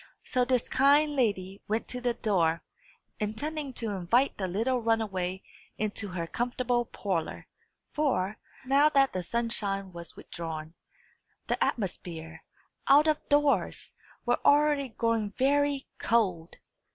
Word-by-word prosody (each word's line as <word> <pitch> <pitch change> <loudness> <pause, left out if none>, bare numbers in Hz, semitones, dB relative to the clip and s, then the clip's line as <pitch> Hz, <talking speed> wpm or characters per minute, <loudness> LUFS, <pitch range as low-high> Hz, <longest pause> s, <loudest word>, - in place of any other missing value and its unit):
So 250 - +1
this 250 -1 +1
kind 290 +2 +4
lady 200 -6 0
went 220 +2 -1
to 250 - -4
the 245 -1 0
door, 170 -8 +1 0.6
intending 280 +7 -3
to 230 -3 -2
invite 205 +8 +2
the 190 - -2
little 230 +7 0
runaway 195 -5 -1 0.3
into 215 0 -2
her 180 -3 -4
comfortable 240 +4 -1
parlour; 185 -7 -3 0.5
for, 215 - 0 0.3
now 280 +3 +5
that 275 -2 +3
the 185 - -1
sunshine 195 -2 -2
was 170 0 -9
withdrawn, 160 -1 -6 0.7
the - - +1
atmosphere, 165 -6 -4 0.4
out 290 +3 +7
of 305 -1 +3
doors, 290 -1 +2 0.3
was 245 0 +2
already 290 -2 +4
growing 225 -2 -1
very 285 +1 +2
cold. 185 -8 +1
230 Hz, 125 wpm, -29 LUFS, 185-270 Hz, 0.7 s, out